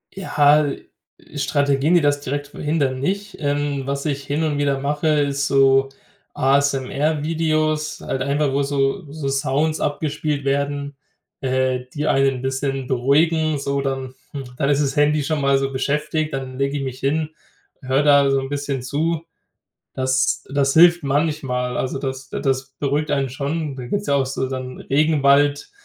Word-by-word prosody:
Ja, 150 -5 +3
äh, - - -5 0.5
Strategien, 140 +3 +2
die 175 - +5
das 145 -1 +1
direkt 145 +1 -3
verhindern, 145 -3 -1
nicht. 200 +7 -3
Ähm. 145 -1 -1
Was 140 +1 -3
ich 140 -2 -2
hin 145 +3 -1
und 150 -2 0
wieder 140 -1 +1
mache, 145 +3 -1
ist 140 -2 +1
so 135 0 +4 0.4
ASMR-Videos 150 +3 0
halt 130 - -3
einfach, 140 +1 +1
wo 140 - +1
so 140 +3 -1
so 150 -2 -4
Sounds 140 +3 0
abgespielt 150 -1 -2
werden, 140 +1 -1 0.5
äh, 130 -1 0
die 150 +1 -2
einen 135 -1 +3
'n - - -7
bisschen 135 0 -2
beruhigen. 155 +5 +2
So 140 0 -1
dann, 135 -1 -3 0.2
hm 140 -2 -5
dann 140 -1 0
ist 145 0 +3
das 140 - -2
Handy 150 0 +3
schon 155 -1 -1
mal 140 0 +3
so 135 0 -1
beschäftigt. 150 +3 -1
Dann 130 -1 -5
lege 140 +1 0
ich 140 - -3
mich 130 -1 -5
hin. 155 +3 0 0.5
Höre 135 +2 +1
da 140 -1 +5
so 135 - +2
'n 135 0 -5
bisschen 140 -2 -3
zu. 160 +5 -1 0.7
Das 130 0 +1
das 140 -1 +1
hilft 175 +1 +6
manchmal, 135 -4 -1
also 130 +1 -2
das 130 -1 -5
d - - -4
das 135 -1 -1
beruhigt 145 +1 -1
einen 135 -2 +1
schon. 145 +3 -3
Da 125 -2 -6
gibt's 205 +9 -2
ja 140 - +3
auch 135 -1 +2
so 130 0 -2
dann 130 -1 -6
Regenwald, 145 -1 +2
140 Hz, 165 wpm, -21 LUFS, 135-150 Hz, 0.7 s, hilft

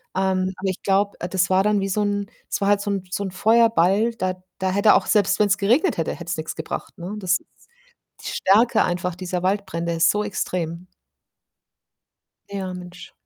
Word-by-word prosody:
Ähm, 190 0 0
aber 190 +1 -2
ich 185 - -4
glaube, 200 +1 +1
äh, 175 - -3
das 185 -1 +1
war 190 +1 +3
dann 210 -1 +2
wie 195 - -1
so 210 +3 0
'n 205 -1 -1 0.2
es - - -1
war 200 - +2
halt 205 -1 +3
so 205 - -3
'n 195 -2 -2
so 200 - -2
'n 190 - -4
Feuerball, 225 0 +3
da 185 -4 -2 0.2
da 190 0 0
hätte 200 +2 +5
auch - - +2
selbst 205 -1 +2
wenn's 205 -1 +3
geregnet 240 - +2
hätte, - - -1
hätte - - -9
es - - -2
nix - - -5
gebracht, - - -6
ne? 180 +4 -6
Das 185 -2 +1
ist - - -27 0.8
die - - -4
Stärke 220 +5 +3
einfach 180 0 -2
dieser 180 0 -4
Waldbrände 170 -4 -1
ist 165 0 +3
so 210 0 -1
extrem. 180 -3 -3 1.6
Ja, 195 -2 -4
Mensch. 180 0 -10
195 Hz, 200 wpm, -22 LUFS, 180-205 Hz, 1.6 s, hätte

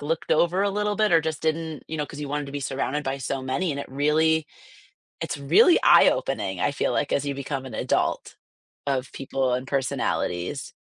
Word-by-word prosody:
looked 160 +3 -1
over 175 +4 +2
a 200 - +1
little 210 +1 -1
bit 215 -3 +2
or 165 - +6
just 160 -1 -4
didn't 160 -1 -2
you 160 - -4
know, 150 - -1
'cause 150 - -9
you 145 - -4
wanted 145 0 -2
to 140 - -9
be 145 - -4
surrounded 140 +2 -2
by 135 +1 -2
so 135 0 -3
many, 135 +7 -1
and 140 - -3
it - - -8
really 155 +3 +2 0.7
it's - - -3
really 160 - +5
eye-opening, - - +3
I - - +1
feel - - -1
like, - - -1
as 140 - +1
you 140 - -1
become 135 -1 -4
an 130 - -8
adult - - -1 0.5
of 135 -2 -1
people 135 -1 -1
and 125 +1 -2
personalities. 110 -9 -2
145 Hz, 205 wpm, -25 LUFS, 135-160 Hz, 0.7 s, or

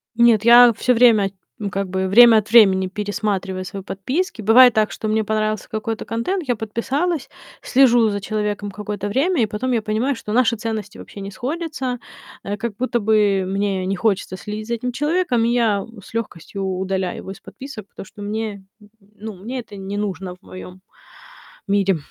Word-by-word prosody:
Нет, 235 -2 +4
я 240 0 +8
всё 250 - +2
время, 225 -5 +4 0.3
ну 205 -2 -3
как 195 0 -3
бы 190 0 -1
время 230 +3 +8
от 210 -1 -1
времени 190 -5 +6
пересматриваю 200 -2 -3
свои 195 0 -7
подписки. 255 - -3
Бывает 240 +4 +7
так, 215 -1 +1
что 220 - -5
мне 220 0 +1
понравился 215 +1 -2
какой-то 220 0 -4
контент, 300 +9 -2
я 245 - +1
подписалась, 265 +10 -2 0.3
слежу 245 -4 +4
за 205 -1 -3
человеком 210 0 -3
какое-то 205 0 -5
время, 285 - +1
и - - +4
потом 215 +5 -3
я 230 - +1
понимаю, 220 +6 -1
что 210 - -7
наши 240 -2 +3
ценности 215 -2 -5
вообще 200 - -10
не 195 +1 -6
сходятся. 260 - -4 0.4
Э, 205 +1 -4
как 220 0 -4
будто 250 -1 -1
бы 205 -3 +2
мне 195 0 -1
не 195 +1 -1
хочется 195 -2 -1
следить 210 +2 -6
за 235 - -1
этим 250 +2 -4
человеком, 295 -3 0
и - - +1
я, 225 -4 +2
м, 220 +1 -10
с - - -16
легкостью 200 -3 -5
удаляю 190 0 -2
его 190 - -8
из 195 - -10
подписок, 260 -7 -10
потому - - -10
что 205 +2 -14
мне, 210 -1 -4 0.2
н 210 - -18 0.3
ну, 215 +1 -7
мне 235 +8 -6
это 225 -4 -10
не 195 +1 -6
нужно 195 -3 -4
в 180 - -31
моем 185 -1 -11 0.9
мире. 195 -3 +2
215 Hz, 185 wpm, -20 LUFS, 195-235 Hz, 0.9 s, я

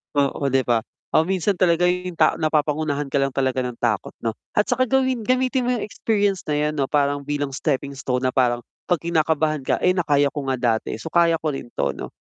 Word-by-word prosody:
Oo, 140 0 +1
'di 135 -1 +2
ba. 120 -2 +2 0.3
Ah 160 - +4
minsan 190 +1 +1
talaga 175 -1 +3
yung 180 -1 -1
tao - - +3
napapangunahan 150 -2 0
ka - - -3
lang 135 0 +1
talaga 130 -1 +1
ng 125 -1 -4
takot 105 -5 -1
'no. 115 - +1 0.2
At 210 - +3
saka 255 +1 +1
gawin 260 -3 +1
gamitin 255 0 +1
mo 250 - +2
yung 230 - -3
experience 205 -3 0
na 150 - 0
yan 150 +1 0
ano 140 -2 0
parang 145 -1 +1
bilang 145 -1 -2
stepping 140 -2 -1
stone 130 -2 -2
na 130 - +2
parang, 120 -2 +2 0.2
pag 175 -4 +2
kinakabahan 155 -3 0
ka. - - +1
Eh 180 - +5
na 175 - +1
kaya 145 -1 +3
ko 145 -2 -5
nga 130 - +1 0.2
dati 110 - -4
so 110 - -8
kaya 170 -1 +4
ko 155 -2 -1
rin 135 -3 -6
to 70 - 0
'no. - - -7
150 Hz, 225 wpm, -22 LUFS, 135-180 Hz, 0.3 s, Eh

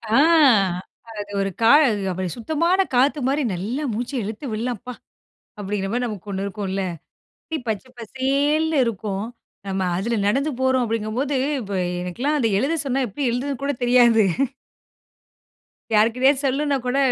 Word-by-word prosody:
ஆ, - - +6 1.0
அது 205 0 -6
ஒரு 195 - 0
கா 225 +1 +6 0.4
அப்பிடி 185 0 -3
சுத்தமான 335 - +1
காத்துமாரி 275 +2 +2
நல்லா 220 +11 -3
மூச்ச 240 +4 -3
இழுத்து 215 +7 -6
விட்லாம்ப்பா, 245 +2 -4 0.6
அப்பிடிங்கிற 200 -1 -3
மாரி 245 0 0
நமக்கு 210 -3 -6
ஒண்ணு 195 +1 -2
இருக்குன்ல. 195 -1 -3 0.9
பச்ச 215 +2 -2
பசேல்னு 285 +6 0
இருக்கும். 205 -2 -3 0.4
நம்ம 190 0 -2 0.2
அதில 230 +5 -1
நடந்து 275 +8 +1
போறோம் 260 -1 +2
அப்பிடிங்கம்போது, 230 +5 -2 0.3
இப்ப 200 -3 -6 0.3
எனக்கெல்லாம் 245 - -1
அத 235 - +2
எழுத 295 +7 0
சொன்னா 270 0 0
எப்பிடி 260 +6 -2
எழுதுறதுன்னு 270 +2 -3
கூட 285 +1 0
தெரியாது. 240 -2 +5 1.7
யாருக்கிட்டயாவது 250 +6 +3
சொல்லணுன்னா 280 +2 +1
கூட 250 +2 0
245 Hz, 125 wpm, -22 LUFS, 210-275 Hz, 1.7 s, ஆ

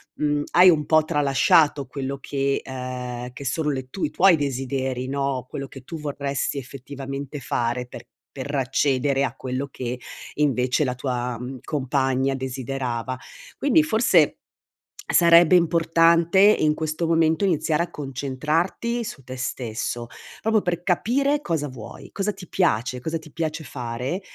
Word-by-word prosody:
mhmm, 145 -1 0
hai 180 +1 +8
un 150 -3 +3
po' 155 0 +4
tralasciato 145 0 +3
quello 135 0 -4
che 140 0 -1
ehm, 125 -1 -5
che 140 - -9
sono 150 +3 0
le 130 -1 -5
tu 190 - -6
i - - -2
tuoi 185 +1 +5
desideri, 130 -2 -2
no, 135 -2 -2
quello 135 -1 -5
che 135 -1 -12
tu 165 +3 -7
vorresti 140 -1 -2
effettivamente 135 +2 -6
fare 120 +1 -1
per - - -10 0.3
per 140 +2 -6
accedere 135 +1 +1
a - - -5
quello 130 +2 -4
che 125 0 -4 0.4
invece 130 -1 +1
la 125 0 -2
tua, 125 -2 -3
mhmm, 125 +1 -6
compagna 135 -2 0
desiderava. 130 -1 -3 0.4
Quindi 305 +2 +4
forse 220 - +3 0.7
sarebbe 170 0 +6
importante 170 +1 +3
in 195 -7 +5
questo 160 +1 -2
momento 165 +2 +2
iniziare 160 -2 +1
a 175 - -7
concentrarti 150 - -2
su 135 - -8
te 130 - -7
stesso, 120 -1 -3 0.3
proprio 220 -1 +2
per 175 -2 -2
capire 275 - +1
cosa 160 - -1
vuoi, 130 - -10
cosa 205 +1 -1
ti 185 -3 -11
piace, 125 - 0
cosa 160 +3 -2
ti 155 -2 -15
piace 160 0 -3
fare 125 - -4
140 Hz, 145 wpm, -24 LUFS, 130-165 Hz, 0.7 s, hai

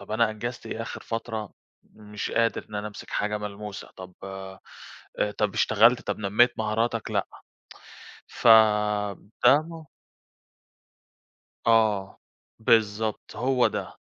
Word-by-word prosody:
طب 100 +1 -13
أنا 110 0 +2
أنجزت 115 +2 -6
إيه 110 0 -4
آخر - - -7
فترة، 115 -2 -4 0.3
مش 105 -1 -7
قادر 115 0 0
إن 105 - -10
أنا 105 +1 -3
أمسك 105 - -11
حاجة 105 0 -1
ملموسة، 105 0 -7
طب 90 -1 -10 1.2
طب 105 -2 0
اشتغلت، 115 +4 +4
طب - - -3
نميت 110 +4 +2
مهاراتك، 110 +1 -1
لأ - - 0 1.0
ف - - -5 1.0
ده 140 +5 +7
م 165 -1 -10 1.8
آه 110 -4 +2 0.4
بالضبط 110 -2 +1
هو 125 0 +2
ده، - - -4
110 Hz, 115 wpm, -26 LUFS, 105-115 Hz, 1.8 s, ده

